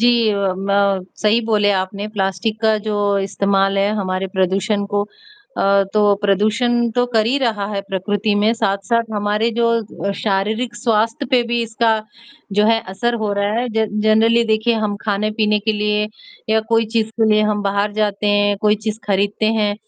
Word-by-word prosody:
जी 240 Hz, -, +4 dB, 0.2 s
अ, 200 Hz, -2 st, 0 dB
म 200 Hz, -1 st, +1 dB, 0.2 s
सही 215 Hz, +2 st, +3 dB
बोले 210 Hz, -2 st, +2 dB
आपने, 195 Hz, +2 st, -4 dB
प्लास्टिक 215 Hz, +2 st, -2 dB
का 220 Hz, -1 st, +3 dB
जो 210 Hz, -, -1 dB, 0.2 s
इस्तेमाल 195 Hz, 0 st, 0 dB
है 200 Hz, +1 st, +2 dB
हमारे 185 Hz, -1 st, -2 dB
प्रदूषण 195 Hz, +3 st, 0 dB
को 205 Hz, 0 st, -1 dB, 0.5 s
अ, 195 Hz, 0 st, +3 dB
तो 205 Hz, -1 st, +4 dB
प्रदूषण 230 Hz, +4 st, +1 dB
तो 245 Hz, +2 st, +1 dB
कर 220 Hz, -1 st, +2 dB
ही 255 Hz, +4 st, +1 dB
रहा 225 Hz, -6 st, -1 dB
है 200 Hz, -, -1 dB
प्रकृति 205 Hz, +2 st, -1 dB
में 210 Hz, +2 st, +2 dB
साथ-साथ 225 Hz, +2 st, -1 dB
हमारे 210 Hz, +2 st, 0 dB
जो 235 Hz, 0 st, +3 dB, 0.4 s
अ, 200 Hz, -, 0 dB
शारीरिक 215 Hz, +4 st, -1 dB
स्वास्थ्य 225 Hz, -1 st, 0 dB
पे 250 Hz, -2 st, +4 dB
भी 235 Hz, 0 st, 0 dB
इसका 230 Hz, 0 st, +1 dB, 0.6 s
जो 210 Hz, +1 st, +3 dB
है, 225 Hz, 0 st, +3 dB
असर 235 Hz, +6 st, -1 dB
हो 205 Hz, -, -1 dB
रहा 200 Hz, +1 st, 0 dB
है 245 Hz, +1 st, -1 dB
जन 215 Hz, -1 st, -1 dB
जनरली 225 Hz, +2 st, +3 dB
देखिए 220 Hz, +1 st, +1 dB
हम 205 Hz, -1 st, -2 dB
खाने-पीने 210 Hz, 0 st, 0 dB
के 215 Hz, +2 st, -1 dB
लिए 210 Hz, 0 st, 0 dB, 0.4 s
या 220 Hz, 0 st, +3 dB
कोई 225 Hz, -1 st, +2 dB
चीज 220 Hz, -1 st, +1 dB
के 220 Hz, -, +4 dB
लिए 215 Hz, 0 st, +3 dB
हम 205 Hz, -1 st, -1 dB
बाहर 200 Hz, +1 st, 0 dB
जाते 210 Hz, -1 st, -1 dB
हैं, 205 Hz, 0 st, +2 dB
कोई 210 Hz, 0 st, +3 dB
चीज 215 Hz, 0 st, -4 dB
खरीदते 205 Hz, +2 st, 0 dB
हैं, 205 Hz, -1 st, +1 dB
210 Hz, 180 wpm, -18 LUFS, 200-225 Hz, 0.6 s, जी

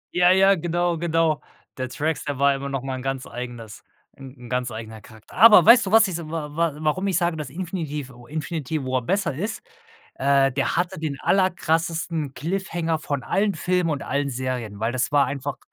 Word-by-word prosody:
Ja, 180 Hz, 0 st, +5 dB
ja, 195 Hz, +1 st, +5 dB
genau, 175 Hz, -1 st, -1 dB
genau. 165 Hz, -2 st, +1 dB, 0.3 s
Der 130 Hz, -1 st, -3 dB
Drax, 155 Hz, +4 st, -2 dB
der 145 Hz, -3 st, -3 dB
war 140 Hz, 0 st, +4 dB
immer 140 Hz, 0 st, -4 dB
noch 135 Hz, -1 st, -3 dB
mal 135 Hz, -, -4 dB
'n 130 Hz, -, -6 dB
ganz 135 Hz, 0 st, -3 dB
eigenes 120 Hz, -3 st, -8 dB, 0.3 s
'n 135 Hz, 0 st, -12 dB
'n -, -, -9 dB
ganz 125 Hz, 0 st, -1 dB
eigener 110 Hz, 0 st, -8 dB
Charakter. 110 Hz, 0 st, -17 dB
Aber 215 Hz, +4 st, +8 dB
weißt 235 Hz, -3 st, +7 dB
du, -, -, -3 dB
was 225 Hz, -1 st, +6 dB
ich 180 Hz, -, -3 dB
wa 155 Hz, -2 st, -6 dB
wa 165 Hz, -1 st, +1 dB
warum 185 Hz, +6 st, 0 dB
ich 185 Hz, -, +1 dB
sage, 170 Hz, -2 st, 0 dB
dass 150 Hz, -4 st, -5 dB
Infinitiv 155 Hz, -5 st, -5 dB
o 120 Hz, 0 st, -15 dB
Infinity 155 Hz, -1 st, -3 dB
War 130 Hz, 0 st, 0 dB
besser 190 Hz, -, 0 dB
ist? 205 Hz, +10 st, -4 dB, 0.5 s
Äh, 135 Hz, 0 st, +3 dB
der 135 Hz, +1 st, -1 dB
hatte 180 Hz, 0 st, -1 dB
den 150 Hz, -3 st, -4 dB
aller 190 Hz, -1 st, +2 dB
krassesten 160 Hz, -3 st, -1 dB
Cliffhanger 170 Hz, -1 st, -2 dB
von 145 Hz, -4 st, -3 dB
allen 200 Hz, 0 st, 0 dB
Filmen 180 Hz, 0 st, 0 dB
und 145 Hz, -2 st, -3 dB
allen 140 Hz, +1 st, -1 dB
Serien, 125 Hz, -5 st, -4 dB
weil 115 Hz, +2 st, 0 dB
das 130 Hz, +3 st, -1 dB
war 145 Hz, -1 st, +4 dB
einfach 140 Hz, 0 st, -4 dB
155 Hz, 200 wpm, -23 LUFS, 135-175 Hz, 0.5 s, Aber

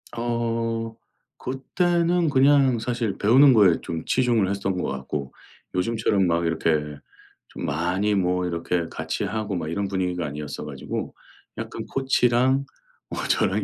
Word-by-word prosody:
어 115 Hz, -1 st, -2 dB, 0.4 s
그때는 170 Hz, +6 st, 0 dB
그냥 135 Hz, -2 st, +4 dB
사실 115 Hz, -3 st, -2 dB
배우는 130 Hz, +6 st, +6 dB
거에 100 Hz, -7 st, +5 dB
좀 80 Hz, -1 st, -5 dB
치중을 120 Hz, -6 st, +2 dB
했던 95 Hz, -1 st, -2 dB
것 -, -, -2 dB
같고 65 Hz, +1 st, -5 dB, 0.4 s
요즘처럼 100 Hz, 0 st, +1 dB
막 85 Hz, 0 st, +1 dB
이렇게 75 Hz, -2 st, 0 dB, 0.5 s
좀 -, -, -6 dB
많이 90 Hz, +7 st, 0 dB
뭐 90 Hz, -1 st, +1 dB
이렇게 85 Hz, 0 st, -1 dB
같이 80 Hz, +4 st, -3 dB
하고 105 Hz, 0 st, -2 dB
막 80 Hz, -3 st, -3 dB
이런 100 Hz, +4 st, -2 dB
분위기가 90 Hz, -3 st, -2 dB
아니었어 75 Hz, 0 st, -6 dB
가지고 -, -, -5 dB, 0.4 s
약간 -, -, -5 dB
코치랑 130 Hz, 0 st, +2 dB, 0.4 s
뭐 -, -, -4 dB
저랑 100 Hz, +2 st, +1 dB
100 Hz, 275 characters per minute, -24 LUFS, 85-120 Hz, 0.5 s, 배우는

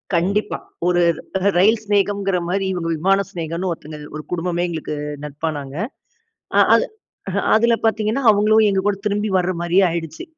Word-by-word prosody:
கண்டிப்பா, 195 Hz, +5 st, 0 dB, 0.3 s
ஒரு 175 Hz, 0 st, +3 dB, 0.6 s
ரயில் 215 Hz, +4 st, +4 dB
சிநேகம்கிற 200 Hz, -2 st, +1 dB
மாதிரி 195 Hz, +1 st, 0 dB
இவங்க 165 Hz, -2 st, -3 dB
விமான 195 Hz, +4 st, +3 dB
சிநேகம்னு 170 Hz, +2 st, -3 dB
ஒருத்தங்க, 155 Hz, -2 st, -7 dB, 0.2 s
ஒரு 155 Hz, -, -6 dB
குடும்பமே 175 Hz, 0 st, -1 dB
எங்களுக்கு 160 Hz, -2 st, -4 dB, 0.3 s
நட்பானாங்க. 145 Hz, -1 st, -5 dB, 0.8 s
அ -, -, +7 dB, 0.2 s
அது -, -, +2 dB, 0.7 s
அதில 235 Hz, +2 st, +4 dB
பார்த்தீங்கன்னா, 220 Hz, +4 st, 0 dB
அவங்களும் 215 Hz, +1 st, +4 dB
எங்க 195 Hz, -1 st, +1 dB
கூட 205 Hz, -, +2 dB
திரும்பி 210 Hz, +1 st, 0 dB
வர 185 Hz, 0 st, 0 dB
மாதிரியே 175 Hz, +3 st, +3 dB
ஆயிடுச்சு. 165 Hz, -2 st, -5 dB
185 Hz, 140 wpm, -20 LUFS, 165-205 Hz, 0.8 s, அ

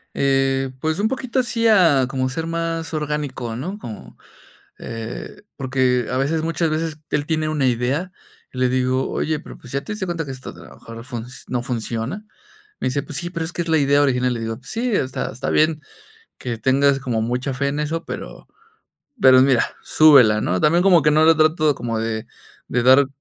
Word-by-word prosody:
Eh, 135 Hz, -1 st, +1 dB
pues 160 Hz, +3 st, -1 dB
un 215 Hz, -, +2 dB
poquito 260 Hz, 0 st, -3 dB
así 230 Hz, -2 st, +1 dB
a 165 Hz, -, +5 dB
como 130 Hz, 0 st, -1 dB
ser 160 Hz, +5 st, -4 dB
más 165 Hz, 0 st, -3 dB
orgánico, 145 Hz, -6 st, -3 dB
¿no?, 185 Hz, -, -5 dB
como, 110 Hz, -, -10 dB, 0.6 s
eh 115 Hz, -, -7 dB
porque 130 Hz, -3 st, +1 dB
a 130 Hz, -, -1 dB
veces 155 Hz, +4 st, 0 dB
muchas 165 Hz, 0 st, 0 dB
veces 155 Hz, 0 st, -2 dB
él 145 Hz, -1 st, -1 dB
tiene 155 Hz, -1 st, 0 dB
una 150 Hz, -4 st, 0 dB
idea, 130 Hz, +9 st, 0 dB, 0.4 s
y 130 Hz, -, -9 dB
le 130 Hz, 0 st, +2 dB
digo: 130 Hz, +1 st, 0 dB
"Oye, 155 Hz, 0 st, -1 dB
pero, -, -, -12 dB
pues, 125 Hz, -, -12 dB
¿ya 140 Hz, -, -1 dB
te 215 Hz, -, -5 dB
diste 205 Hz, -3 st, -4 dB
cuenta 170 Hz, -2 st, -3 dB
que 135 Hz, -, -8 dB
esto 130 Hz, -1 st, -7 dB
a -, -, -12 dB
lo -, -, -14 dB
mejor 115 Hz, 0 st, -11 dB
func 120 Hz, -3 st, -6 dB, 0.2 s
no 125 Hz, -1 st, -2 dB
funciona?". 125 Hz, -, -4 dB, 0.6 s
Me -, -, 0 dB
dice: 140 Hz, +2 st, -1 dB
"Pues 140 Hz, 0 st, -6 dB
sí, 175 Hz, +1 st, -5 dB
pero 165 Hz, -2 st, -3 dB
es 165 Hz, -, -5 dB
que 175 Hz, -, -2 dB
es 170 Hz, -, -8 dB
la 160 Hz, -1 st, +3 dB
idea 140 Hz, 0 st, +3 dB
original". 125 Hz, -2 st, +1 dB
Y -, -, -2 dB
le 115 Hz, -, -5 dB
digo: 115 Hz, 0 st, -4 dB
"Sí, 235 Hz, -, -3 dB
está 130 Hz, -9 st, -1 dB
está 120 Hz, -, -4 dB
bien 155 Hz, 0 st, +2 dB, 0.6 s
que 120 Hz, -2 st, -4 dB
tengas 135 Hz, +3 st, +2 dB
como 120 Hz, -4 st, -2 dB
mucha 125 Hz, +4 st, -2 dB
fe 140 Hz, +2 st, -1 dB
en 145 Hz, +2 st, -2 dB
eso, 160 Hz, +3 st, -3 dB
pero -, -, -8 dB, 0.8 s
pero 130 Hz, -1 st, +7 dB
mira, 130 Hz, -3 st, +4 dB, 0.2 s
súbela", 125 Hz, -9 st, +6 dB
¿no? 90 Hz, +1 st, 0 dB
También 170 Hz, +3 st, +3 dB
como 180 Hz, -4 st, +6 dB
que 150 Hz, -, +3 dB
no 155 Hz, +1 st, +4 dB
le 165 Hz, -, +7 dB
trato 155 Hz, -1 st, +3 dB
como 115 Hz, -2 st, -3 dB
de 110 Hz, -1 st, -3 dB, 0.4 s
de 125 Hz, 0 st, 0 dB
dar 130 Hz, +2 st, +6 dB
140 Hz, 205 wpm, -21 LUFS, 125-160 Hz, 0.8 s, pero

